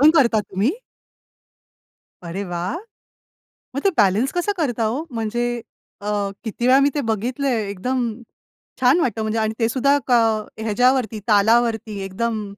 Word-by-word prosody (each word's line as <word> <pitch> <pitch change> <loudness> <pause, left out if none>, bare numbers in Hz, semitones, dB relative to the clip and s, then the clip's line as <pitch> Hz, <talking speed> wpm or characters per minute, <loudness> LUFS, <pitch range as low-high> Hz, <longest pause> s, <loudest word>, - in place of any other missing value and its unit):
पण 300 +2 +8
करता 235 -7 +4
तुम्ही? 200 +4 0 1.5
अरे 170 +4 -4
वा! 175 0 -3 1.1
मग 280 - -1
ते 395 - +5
बॅलन्स 210 +5 +3
कसं 355 +3 0
करता 245 -8 0
हो 245 +8 -1
म्हणजे 240 +1 -2 0.4
अ, 205 - -6 0.4
किती 235 +2 -2
वेळा 260 +1 +6
मी 280 +1 +4
ते 290 - +1
बघितलंय. 240 +2 -1
एकदम 250 +7 -2 0.8
छान 260 +7 +5
वाटतं 230 - 0
म्हणजे 220 +1 -1
आणि 220 0 0
ते 225 - +3
सुद्धा 275 +3 +3
का 245 -2 +5 0.4
ह्याच्यावरती 230 +1 +2
तालावरती 220 0 +3
एकदम. 215 +3 -2
230 Hz, 140 wpm, -21 LUFS, 215-260 Hz, 1.5 s, पण